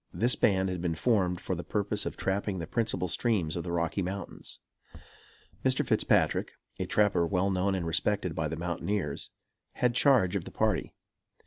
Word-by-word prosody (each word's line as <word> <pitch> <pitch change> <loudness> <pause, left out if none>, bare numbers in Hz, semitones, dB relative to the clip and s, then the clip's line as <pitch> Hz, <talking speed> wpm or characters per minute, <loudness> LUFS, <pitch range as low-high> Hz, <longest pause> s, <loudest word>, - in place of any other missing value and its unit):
This 120 +3 +3
band 95 -2 +2
had 90 -2 -3
been 85 -2 -1
formed 90 -2 +1
for - - -3
the 85 -1 -4
purpose 105 0 -1
of - - -5
trapping 95 0 -1
the 85 - -4
principal 110 -1 0
streams 90 -3 0
of 85 - -3
the 85 - -4
Rocky 85 +3 0
Mountains. 95 +2 -5 1.1
Mr. - - +2
Fitzpatrick, - - +2 0.3
a - - -2
trapper 100 -5 +3
well 95 +2 +1
known 95 +1 +1
and 90 -3 -2
respected 90 +2 0
by 80 -1 -1
the 80 +1 -4
mountaineers, 85 -1 -3 0.4
had 125 -1 +1
charge 120 -8 +4
of 95 - -2
the - - -7
party. - - 0
95 Hz, 175 wpm, -29 LUFS, 85-105 Hz, 1.1 s, charge